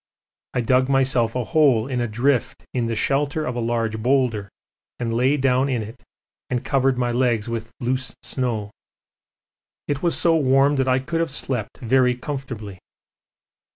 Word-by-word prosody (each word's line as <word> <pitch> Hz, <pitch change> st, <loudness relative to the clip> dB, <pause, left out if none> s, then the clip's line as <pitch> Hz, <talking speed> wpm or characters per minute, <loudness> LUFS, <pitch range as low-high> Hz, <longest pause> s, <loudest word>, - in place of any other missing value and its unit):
I 125 Hz, -, +2 dB
dug 130 Hz, +2 st, +2 dB
myself 130 Hz, -4 st, +2 dB
a 125 Hz, -, 0 dB
hole 135 Hz, -6 st, +3 dB
in 125 Hz, -2 st, -2 dB
a 120 Hz, -, 0 dB
drift 120 Hz, +4 st, 0 dB
in 125 Hz, -2 st, 0 dB
the 115 Hz, 0 st, -2 dB
shelter 145 Hz, +6 st, 0 dB
of 125 Hz, -, -3 dB
a -, -, -2 dB
large 115 Hz, -2 st, -1 dB
boulder 120 Hz, -5 st, +1 dB, 0.5 s
and 115 Hz, -2 st, -2 dB
lay 130 Hz, +5 st, +2 dB
down 130 Hz, 0 st, +2 dB
in 120 Hz, -4 st, -1 dB
it, 115 Hz, +4 st, -11 dB, 0.5 s
and 125 Hz, -1 st, -2 dB
covered 135 Hz, -2 st, +2 dB
my 120 Hz, -1 st, 0 dB
legs 120 Hz, -3 st, +1 dB
with 115 Hz, 0 st, -4 dB
loose 130 Hz, +1 st, -2 dB
snow. 115 Hz, -6 st, -2 dB, 1.2 s
It 145 Hz, -1 st, -2 dB
was 170 Hz, -1 st, +1 dB
so 165 Hz, -1 st, +3 dB
warm 140 Hz, -1 st, +3 dB
that 130 Hz, 0 st, +1 dB
I 130 Hz, 0 st, +3 dB
could 155 Hz, +6 st, -2 dB
have 165 Hz, -, 0 dB
slept 130 Hz, -5 st, -2 dB
very 125 Hz, +1 st, +3 dB
comfortably. 125 Hz, -8 st, -6 dB
125 Hz, 165 wpm, -22 LUFS, 115-135 Hz, 1.2 s, hole